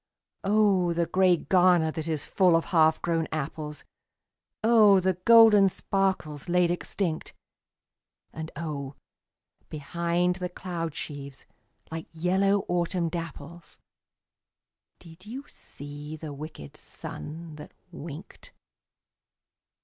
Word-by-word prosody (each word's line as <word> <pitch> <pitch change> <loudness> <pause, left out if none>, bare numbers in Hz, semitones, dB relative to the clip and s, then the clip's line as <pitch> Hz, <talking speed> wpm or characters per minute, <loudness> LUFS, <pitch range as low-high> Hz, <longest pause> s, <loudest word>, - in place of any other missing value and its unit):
Oh, 195 -4 +3
the 170 0 +1
grey 185 +1 +3
garner 175 -3 +3
that 160 0 -5
is 155 -3 -2
full 180 -3 +3
of 165 - +1
half 160 -1 +4
grown 165 -1 0
apples, 155 0 -5 0.8
Oh, 215 -4 +6
the 185 0 +1
golden 225 -4 +7
sparkles 185 -6 -2
laid 175 0 +3
extinct! 175 -1 -3 1.0
And 160 0 -6
oh, 140 -3 -5 0.7
behind 170 +4 -1
the 180 -1 -4
cloud 170 -4 -5
sheaves, 140 -3 -7 0.5
like 160 0 -6
yellow 190 +4 +1
autumn 175 0 0
dapples, 165 0 -8 1.2
Did 170 +4 -16
you 265 +5 -7
see 145 +2 -9
the 155 -1 -7
wicked 140 - -9
sun 160 0 -8
that 150 - -11 0.2
winked? 165 +1 -10
170 Hz, 105 wpm, -27 LUFS, 155-185 Hz, 1.2 s, golden